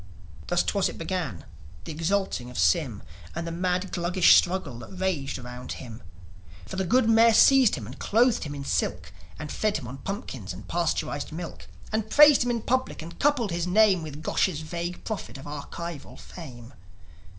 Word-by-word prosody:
'Twas 175 Hz, -, +2 dB
thus 200 Hz, -2 st, +1 dB
it -, -, -9 dB
began, 165 Hz, -, -4 dB, 0.4 s
the 165 Hz, -, -6 dB
exalting 165 Hz, -5 st, -1 dB
of 125 Hz, -, -9 dB
Sym, 80 Hz, -1 st, +1 dB, 0.3 s
And 170 Hz, 0 st, -3 dB
the 170 Hz, -, -4 dB
mad 180 Hz, +2 st, -1 dB
Gluggish 175 Hz, +1 st, +4 dB
struggle 175 Hz, -9 st, +1 dB
that -, -, -9 dB
raged 180 Hz, -7 st, -1 dB
around 125 Hz, 0 st, -7 dB
him. 120 Hz, -2 st, -9 dB, 0.6 s
For -, -, -7 dB
the 190 Hz, 0 st, -1 dB
good 245 Hz, +4 st, +3 dB
Mayor 225 Hz, 0 st, +6 dB
seized 265 Hz, -3 st, +6 dB
him, 120 Hz, -8 st, -7 dB
and 125 Hz, -, -10 dB
clothed 235 Hz, +2 st, +2 dB
him 145 Hz, -2 st, -5 dB
in 140 Hz, -1 st, -6 dB
silk, -, -, -2 dB, 0.2 s
And 150 Hz, -2 st, -6 dB
fed 215 Hz, -1 st, 0 dB
him 130 Hz, -, -7 dB
on 130 Hz, +3 st, -8 dB
pumpkins 130 Hz, -, -6 dB
and 95 Hz, +4 st, -11 dB
pasteurised 165 Hz, -4 st, -1 dB
milk, 165 Hz, +2 st, -7 dB, 0.2 s
And 220 Hz, 0 st, -1 dB
praised 295 Hz, +1 st, +7 dB
him 245 Hz, -, -2 dB
in 235 Hz, -2 st, -1 dB
public, 255 Hz, -9 st, -1 dB
and 170 Hz, +1 st, -11 dB
coupled 275 Hz, -8 st, +2 dB
his 170 Hz, +1 st, -1 dB
name 195 Hz, -1 st, +4 dB
With 155 Hz, -1 st, -8 dB
Gosh's 160 Hz, 0 st, 0 dB
vague 170 Hz, +2 st, -5 dB
prophet 215 Hz, -9 st, -5 dB
of 135 Hz, -, -11 dB
archival 150 Hz, +2 st, -7 dB
fame. 125 Hz, -7 st, -11 dB
170 Hz, 180 wpm, -26 LUFS, 140-200 Hz, 0.6 s, praised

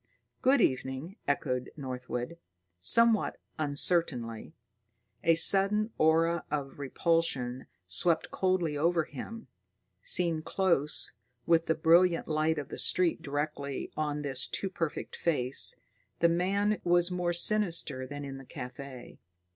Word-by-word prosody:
"Good 260 Hz, 0 st, +3 dB
evening," 130 Hz, -, -2 dB
echoed 125 Hz, -3 st, -2 dB
Northwood, 125 Hz, +2 st, -6 dB, 0.4 s
somewhat 230 Hz, -, +5 dB, 0.2 s
uncertainly. 140 Hz, -6 st, 0 dB, 0.7 s
A 165 Hz, -, +4 dB
sudden 200 Hz, +5 st, +3 dB
aura 165 Hz, +2 st, +2 dB
of 145 Hz, -2 st, -5 dB
repulsion 135 Hz, -4 st, -1 dB, 0.2 s
swept 160 Hz, -, +1 dB
coldly 185 Hz, -5 st, -1 dB
over 165 Hz, +3 st, +1 dB
him. 225 Hz, -, -9 dB, 0.5 s
Seen 165 Hz, -, +2 dB
close, 160 Hz, -5 st, 0 dB, 0.3 s
with 165 Hz, -1 st, +2 dB
the 160 Hz, -, +1 dB
brilliant 170 Hz, +2 st, +3 dB
light 155 Hz, +1 st, 0 dB
of 145 Hz, -2 st, -6 dB
the -, -, -7 dB
street 175 Hz, -2 st, +1 dB
directly 145 Hz, -2 st, -4 dB
on 150 Hz, -1 st, -3 dB
his 135 Hz, -3 st, -1 dB
too 195 Hz, -, -4 dB
perfect 165 Hz, -5 st, -4 dB
face, 135 Hz, -6 st, +2 dB, 0.4 s
the 170 Hz, -, +4 dB
man 200 Hz, +5 st, 0 dB
was 175 Hz, 0 st, +2 dB
more 180 Hz, -1 st, -1 dB
sinister 170 Hz, -8 st, +2 dB
than 145 Hz, 0 st, -7 dB
in 135 Hz, -1 st, -7 dB
the 135 Hz, -, -13 dB
café. 130 Hz, -2 st, -10 dB
160 Hz, 120 wpm, -29 LUFS, 140-175 Hz, 0.7 s, somewhat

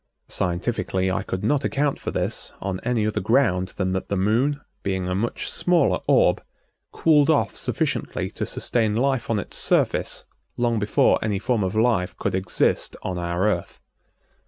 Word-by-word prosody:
Scientifically 95 Hz, +1 st, -1 dB
I -, -, 0 dB
could 95 Hz, -, -4 dB
not 140 Hz, +6 st, +1 dB
account 145 Hz, 0 st, 0 dB
for -, -, -4 dB
this -, -, -3 dB
on 95 Hz, -2 st, -3 dB
any 120 Hz, -3 st, +1 dB
other 105 Hz, 0 st, 0 dB
ground 105 Hz, -4 st, +2 dB
than 95 Hz, -2 st, 0 dB
that 95 Hz, 0 st, -3 dB
the 100 Hz, -, 0 dB
Moon, 120 Hz, +9 st, +1 dB, 0.2 s
being 95 Hz, -2 st, -2 dB
a 90 Hz, -, -1 dB
much 110 Hz, +6 st, -2 dB
smaller 165 Hz, -, +2 dB
orb, -, -, +4 dB, 0.5 s
cooled 150 Hz, -3 st, +3 dB
off 155 Hz, -, +2 dB
sufficiently -, -, -2 dB
to -, -, -4 dB
sustain 110 Hz, -3 st, 0 dB
life 130 Hz, +1 st, 0 dB
on 115 Hz, -, +1 dB
its 100 Hz, -, -4 dB
surface -, -, +1 dB, 0.3 s
long 120 Hz, -2 st, +1 dB
before 105 Hz, 0 st, +3 dB
any 105 Hz, -2 st, 0 dB
form 115 Hz, +1 st, 0 dB
of 95 Hz, +2 st, -2 dB
life 105 Hz, -6 st, +1 dB
could -, -, -2 dB
exist 95 Hz, -1 st, 0 dB
on 90 Hz, -1 st, -3 dB
our 85 Hz, +3 st, 0 dB
Earth. 90 Hz, -5 st, -2 dB
105 Hz, 165 wpm, -23 LUFS, 95-120 Hz, 0.5 s, orb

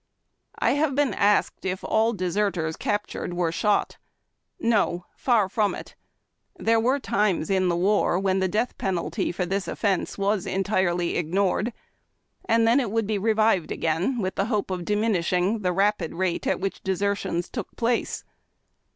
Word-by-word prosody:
I -, -, +2 dB
have 285 Hz, -1 st, +1 dB
been 285 Hz, -6 st, +2 dB
asked 205 Hz, +1 st, +2 dB
if 185 Hz, 0 st, -3 dB
all 220 Hz, +1 st, +2 dB
deserters 180 Hz, -4 st, -1 dB
captured 205 Hz, -3 st, -3 dB
were 175 Hz, -2 st, 0 dB
shot. 205 Hz, +4 st, 0 dB, 0.6 s
No; 205 Hz, -6 st, +1 dB
far 230 Hz, -6 st, +2 dB
from 205 Hz, +1 st, 0 dB
it. -, -, -9 dB, 0.6 s
There 225 Hz, 0 st, +2 dB
were 255 Hz, +5 st, +2 dB
times 200 Hz, -, 0 dB
in 185 Hz, -1 st, +2 dB
the 170 Hz, -, +1 dB
war 190 Hz, 0 st, +2 dB
when 190 Hz, 0 st, +1 dB
the 190 Hz, -, +1 dB
death 220 Hz, +6 st, -1 dB
penalty 185 Hz, -3 st, -1 dB
for 180 Hz, +1 st, -2 dB
this 195 Hz, +2 st, -2 dB
offence 200 Hz, -4 st, -1 dB
was 200 Hz, -1 st, 0 dB
entirely 185 Hz, -3 st, 0 dB
ignored, 190 Hz, +7 st, 0 dB, 0.7 s
and 230 Hz, 0 st, +3 dB
then 235 Hz, +4 st, +5 dB
it 245 Hz, -6 st, -1 dB
would 225 Hz, +1 st, 0 dB
be 210 Hz, 0 st, -1 dB
revived 215 Hz, -4 st, +2 dB
again 165 Hz, +11 st, 0 dB
with 190 Hz, -4 st, -1 dB
the 195 Hz, -, 0 dB
hope 210 Hz, -4 st, -1 dB
of 180 Hz, -2 st, -3 dB
diminishing 205 Hz, -1 st, +1 dB
the 185 Hz, -3 st, 0 dB
rapid 195 Hz, -2 st, 0 dB
rate 185 Hz, -1 st, -1 dB
at -, -, +1 dB
which 195 Hz, +1 st, -3 dB
desertions 190 Hz, -2 st, -1 dB
took 230 Hz, -7 st, -6 dB
place. 235 Hz, 0 st, -1 dB
200 Hz, 160 wpm, -25 LUFS, 180-220 Hz, 0.7 s, then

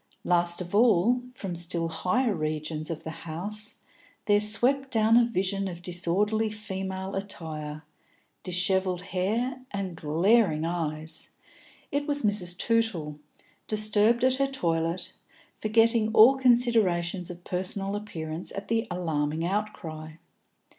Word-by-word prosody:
Last 175 Hz, 0 st, +2 dB
of 175 Hz, +1 st, -7 dB
all, 230 Hz, +2 st, +4 dB
from 195 Hz, -8 st, -6 dB
still 170 Hz, 0 st, -2 dB
higher 210 Hz, +8 st, 0 dB
regions 155 Hz, -1 st, -3 dB
of 165 Hz, -2 st, -5 dB
the 160 Hz, -, -5 dB, 0.2 s
house 210 Hz, +7 st, -3 dB, 0.4 s
there 205 Hz, 0 st, +4 dB
swept 250 Hz, +6 st, +4 dB
down 225 Hz, -1 st, +3 dB
a 240 Hz, -, +7 dB
vision 195 Hz, -3 st, -1 dB
of 175 Hz, -1 st, -7 dB
disordered 205 Hz, +5 st, 0 dB
female 190 Hz, -2 st, -5 dB
attire, 155 Hz, -6 st, -6 dB, 0.6 s
dishevelled 185 Hz, 0 st, 0 dB
hair, 220 Hz, +8 st, -1 dB
and 195 Hz, -3 st, -4 dB
glaring 165 Hz, +2 st, +2 dB
eyes; 160 Hz, -2 st, -2 dB, 0.6 s
it 285 Hz, +1 st, -1 dB
was 285 Hz, -2 st, 0 dB
Mrs. 190 Hz, -4 st, 0 dB
Tootle, 190 Hz, -11 st, 0 dB, 0.5 s
disturbed 215 Hz, +2 st, +2 dB
at 260 Hz, 0 st, +4 dB
her 275 Hz, 0 st, +2 dB
toilet, 170 Hz, -8 st, -1 dB, 0.5 s
forgetting 225 Hz, 0 st, +3 dB
all 235 Hz, +5 st, +8 dB
considerations 220 Hz, -9 st, +2 dB
of 175 Hz, 0 st, -9 dB
personal 195 Hz, +2 st, -2 dB
appearance 165 Hz, -5 st, -5 dB
at 195 Hz, 0 st, -7 dB
the 225 Hz, 0 st, 0 dB
alarming 160 Hz, -3 st, -1 dB
outcry. 170 Hz, -6 st, -4 dB
190 Hz, 120 wpm, -27 LUFS, 170-220 Hz, 0.6 s, all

